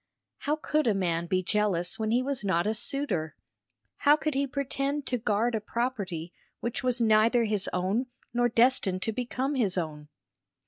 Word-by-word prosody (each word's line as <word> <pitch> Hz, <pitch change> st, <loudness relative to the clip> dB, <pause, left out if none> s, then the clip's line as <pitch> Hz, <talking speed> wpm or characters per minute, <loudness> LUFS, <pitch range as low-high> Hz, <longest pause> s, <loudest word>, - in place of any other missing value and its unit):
How 300 Hz, 0 st, 0 dB
could 305 Hz, -2 st, 0 dB
a 215 Hz, -, +3 dB
man 170 Hz, -3 st, 0 dB
be 185 Hz, +1 st, +1 dB
jealous 200 Hz, 0 st, 0 dB
when 220 Hz, -1 st, -1 dB
he 245 Hz, +3 st, +2 dB
was 275 Hz, -4 st, -2 dB
not 180 Hz, -3 st, +1 dB
a 215 Hz, -, +1 dB
suitor? 215 Hz, -, -1 dB, 0.6 s
how 290 Hz, +1 st, +5 dB
could 305 Hz, 0 st, -2 dB
he 275 Hz, +1 st, 0 dB
pretend 280 Hz, +1 st, -2 dB
to 250 Hz, -, -1 dB
guard 225 Hz, +2 st, +1 dB
a 220 Hz, -, -1 dB
property 200 Hz, -8 st, -3 dB, 0.3 s
which 235 Hz, -, -3 dB
was 250 Hz, -1 st, +1 dB
neither 230 Hz, +1 st, +4 dB
his 210 Hz, -3 st, 0 dB
own 195 Hz, +8 st, 0 dB, 0.3 s
nor 240 Hz, 0 st, +2 dB
destined 230 Hz, -6 st, +2 dB
to 225 Hz, -, 0 dB
become 255 Hz, +4 st, -2 dB
his 210 Hz, -9 st, +1 dB
own? 150 Hz, -3 st, -4 dB
225 Hz, 175 wpm, -28 LUFS, 190-255 Hz, 0.6 s, how